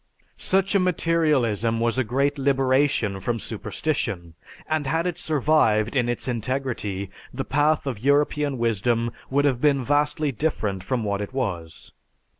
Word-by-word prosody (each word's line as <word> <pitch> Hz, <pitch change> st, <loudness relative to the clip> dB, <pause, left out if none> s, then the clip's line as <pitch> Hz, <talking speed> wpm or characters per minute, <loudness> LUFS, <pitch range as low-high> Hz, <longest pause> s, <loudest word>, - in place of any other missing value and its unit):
"Such 195 Hz, +1 st, +1 dB
a 200 Hz, -, +4 dB
materialism 150 Hz, -, +1 dB
was 115 Hz, +2 st, +1 dB
a -, -, +3 dB
great 140 Hz, +5 st, 0 dB
liberation 135 Hz, -6 st, +2 dB
from 115 Hz, +4 st, -1 dB
superstition; 85 Hz, -5 st, -3 dB, 0.3 s
and 155 Hz, -3 st, -1 dB
had 160 Hz, +4 st, 0 dB
it 175 Hz, -1 st, -2 dB
survived 140 Hz, -8 st, +2 dB
in 120 Hz, -2 st, +2 dB
its 120 Hz, -, -3 dB
integrity, 115 Hz, -5 st, -3 dB, 0.2 s
the 135 Hz, +2 st, -4 dB
path 150 Hz, +2 st, +2 dB
of 130 Hz, -7 st, -3 dB
European 145 Hz, +1 st, +1 dB
wisdom 115 Hz, +1 st, 0 dB, 0.2 s
would 145 Hz, +2 st, +2 dB
have 130 Hz, -4 st, +1 dB
been 140 Hz, -3 st, +3 dB
vastly 145 Hz, +2 st, +1 dB
different 105 Hz, -9 st, -2 dB
from 125 Hz, +1 st, -1 dB
what 100 Hz, -1 st, -1 dB
it 105 Hz, -, -6 dB
was. 90 Hz, -, -4 dB
130 Hz, 145 wpm, -24 LUFS, 115-145 Hz, 0.3 s, a